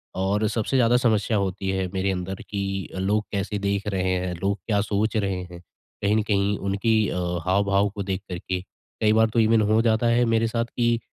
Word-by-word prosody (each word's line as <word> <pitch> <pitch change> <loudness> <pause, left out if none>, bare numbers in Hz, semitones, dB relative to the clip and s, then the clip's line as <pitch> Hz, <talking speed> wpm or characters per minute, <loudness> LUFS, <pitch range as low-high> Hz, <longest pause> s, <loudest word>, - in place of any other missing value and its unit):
और 100 +3 +1
सबसे 115 +5 0
ज़्यादा 120 0 +4
समस्या 110 -3 +1
होती 95 0 -2
है, 95 -1 -1
मेरे 95 +1 0
अंदर 95 +1 -4
की 95 -1 -3
अ, - - -4
लोग 105 +3 +1
कैसे 100 0 -2
देख 100 0 -1
रहे 95 -2 0
हैं, 90 0 -2
लोग 100 +1 +1
क्या 100 -2 +2
सोच 110 +1 0
रहे 95 -3 -1
हैं, 85 - -9 0.4
कहीं 105 +1 +3
न - - +3
कहीं 100 0 +2
उनकी 100 +3 0
अ, - - -3 0.3
हाव-भाव 100 +1 +2
को 100 - -3
देख 95 0 -3
कर 90 - -3
के, 90 0 -3 0.4
कई 110 0 +4
बार 110 0 +4
तो 115 - 0
इवेन 110 0 +4
हो 110 +1 +4
जाता 115 0 +2
है 120 +1 +3
मेरे 115 0 +2
साथ 115 +1 -1
कि 120 -1 0
100 Hz, 215 wpm, -24 LUFS, 95-110 Hz, 0.4 s, ज़्यादा